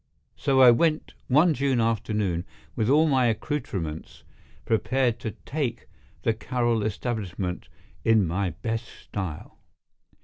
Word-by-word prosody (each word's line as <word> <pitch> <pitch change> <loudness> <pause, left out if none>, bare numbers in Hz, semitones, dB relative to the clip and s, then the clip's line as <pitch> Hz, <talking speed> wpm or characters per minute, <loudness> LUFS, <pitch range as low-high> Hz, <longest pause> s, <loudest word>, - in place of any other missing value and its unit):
So 135 -1 +2
I 125 -2 +10
went 155 +6 +1
one 155 +6 +5
June 135 -2 +1
afternoon, 105 -6 0 0.3
with 110 +1 0
all 155 +3 +5
my 130 -4 +3
accoutrements, 100 - -3 0.4
prepared 120 +1 +1
to 110 - -5
"take" 130 -6 -3 0.4
the 115 - +2
Carroll 120 0 0
establishment 100 -4 -3 0.3
in 110 -3 +4
my 90 +3 -1
best 115 +8 -4
style. 95 -11 -7
115 Hz, 115 wpm, -26 LUFS, 100-130 Hz, 0.4 s, I